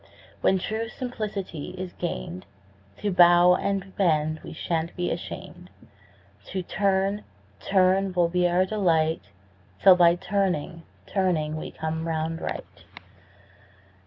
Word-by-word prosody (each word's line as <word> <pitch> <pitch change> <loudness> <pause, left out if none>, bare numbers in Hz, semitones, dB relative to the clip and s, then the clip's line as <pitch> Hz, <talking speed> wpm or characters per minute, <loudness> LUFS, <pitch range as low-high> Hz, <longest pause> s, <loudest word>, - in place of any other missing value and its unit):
When 190 - +3
true 220 +4 -3
simplicity 210 - -5
is 185 -1 -6
gain'd, 90 - -5 0.6
To 205 - +1
bow 175 0 +7
and 195 +1 0
to - - -16
bend 155 -5 +1
we - - -8
shan't 165 0 -3
be 175 0 -1
asham'd, 180 +1 -7 0.8
To 185 -1 -4
turn, 195 +2 0 0.4
turn 190 0 +2
will 175 -2 +2
be 180 +1 +2
our 180 +2 +3
delight 165 - +1 0.5
'Till 190 - +8
by 170 -1 +5
turning, 180 -3 -1 0.2
turning 170 -6 0
we 155 - -5
come 160 +1 -4
round 160 0 -2
right. - - -6
180 Hz, 125 wpm, -26 LUFS, 165-190 Hz, 0.8 s, Till